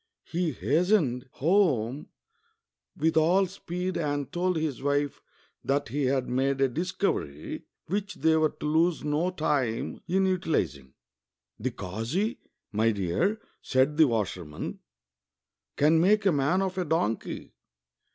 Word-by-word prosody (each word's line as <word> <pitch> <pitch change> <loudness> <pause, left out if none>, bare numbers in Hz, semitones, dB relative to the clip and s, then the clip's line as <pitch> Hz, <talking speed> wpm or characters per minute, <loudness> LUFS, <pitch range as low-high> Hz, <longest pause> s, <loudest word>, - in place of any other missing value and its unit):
He 170 0 -1
hastened 145 - +1
home 145 - +2 0.9
with 160 0 +1
all 175 +5 +4
speed 180 0 -4
and 145 -4 -2
told 180 0 +1
his 155 -6 -2
wife 145 0 0 0.4
that 140 -2 0
he 140 +3 -1
had 130 -1 +1
made 135 +2 0
a 135 - +4
discover}' 155 - -2 0.3
which 200 +3 -2
they 160 +2 +3
were 155 -1 +3
to - - -9
lose 160 +3 +2
no 150 +4 +1
time 145 -9 -1
in 190 +2 +2
utilizing. 160 - -1 0.3
'' 65 0 -54
The 125 +5 -1
kazi, 115 - -3 0.3
my 110 +2 +2
dear," 105 - 0 0.2
said 135 +3 +2
the 160 -2 +7
washerman, 95 - -3 0.5
" - - -63
can 155 +3 +4
make 210 +3 +4
a 195 - +5
man 150 +6 +2
of 190 -1 -2
a 180 - 0
donkey. 130 -9 -2
150 Hz, 135 wpm, -28 LUFS, 125-180 Hz, 0.9 s, the